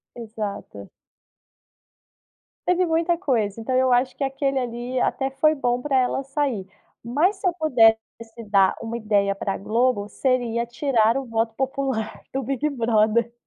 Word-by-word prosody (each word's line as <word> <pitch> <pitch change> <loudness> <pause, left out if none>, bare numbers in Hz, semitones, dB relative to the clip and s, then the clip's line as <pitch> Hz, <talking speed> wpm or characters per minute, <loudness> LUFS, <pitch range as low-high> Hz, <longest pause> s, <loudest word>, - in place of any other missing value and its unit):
Exato. 215 -3 -7 1.8
Teve 360 0 +2
muita 335 +1 +1
coisa. 230 - -1
Então 240 +3 -2
eu 260 0 +3
acho 250 +1 +2
que - - -3
aquele 270 0 -1
ali 245 0 -3
até 270 0 0
foi 305 +3 +3
bom 245 -3 -1
para 275 -1 0
ela 255 +1 +1
sair. 270 -7 -2 0.4
Mas, 300 - +1
se 385 - -2
eu 350 - +1
pudesse 240 -9 +4 0.5
dar 195 -2 +4
uma 230 0 -5
ideia 205 -3 +1
para 195 0 -3
Globo, 230 0 0
seria 240 -1 0
tirar 240 -1 +1
o 270 - -3
voto 225 -1 -1
popular 265 -4 -3
do 270 - -1
Big 275 +4 -1
Brother. 230 -2 +1
250 Hz, 145 wpm, -23 LUFS, 225-275 Hz, 1.8 s, pudesse